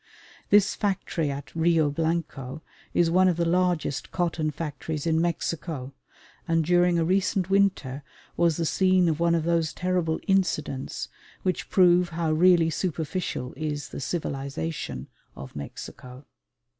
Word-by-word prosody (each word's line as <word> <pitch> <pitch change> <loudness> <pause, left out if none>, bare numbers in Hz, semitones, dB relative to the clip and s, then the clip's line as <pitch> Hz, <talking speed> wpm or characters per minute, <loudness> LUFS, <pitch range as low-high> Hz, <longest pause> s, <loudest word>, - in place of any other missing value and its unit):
This 205 0 +5
factory 190 -6 -1
at 140 +2 -6
Rio 165 -2 +3
Blanco 160 -3 -3 0.3
is 170 -1 +2
one 185 +2 +5
of 175 -2 +2
the 170 - +1
largest 175 -4 0
cotton 170 -3 0
factories 150 0 -4
in 160 -1 +2
Mexico, 160 -5 -3 0.5
and 165 -1 +2
during 175 0 +3
a 165 - +2
recent 190 +1 +1
winter 190 -9 +1 0.3
was 170 -3 +2
the 165 - 0
scene 185 +1 +3
of 160 -1 0
one 170 0 +3
of 165 - 0
those 165 -1 +1
terrible 180 -3 0
"incidents" 155 -8 0 0.4
which 185 - -1
prove 180 -1 +5
how 165 -1 -1
really 165 0 +4
superficial 160 -6 -3
is 150 -2 -4
the - - -7
civilisation 140 - -4 0.3
of 70 - -10
Mexico. 125 - -9
165 Hz, 135 wpm, -26 LUFS, 150-180 Hz, 0.5 s, This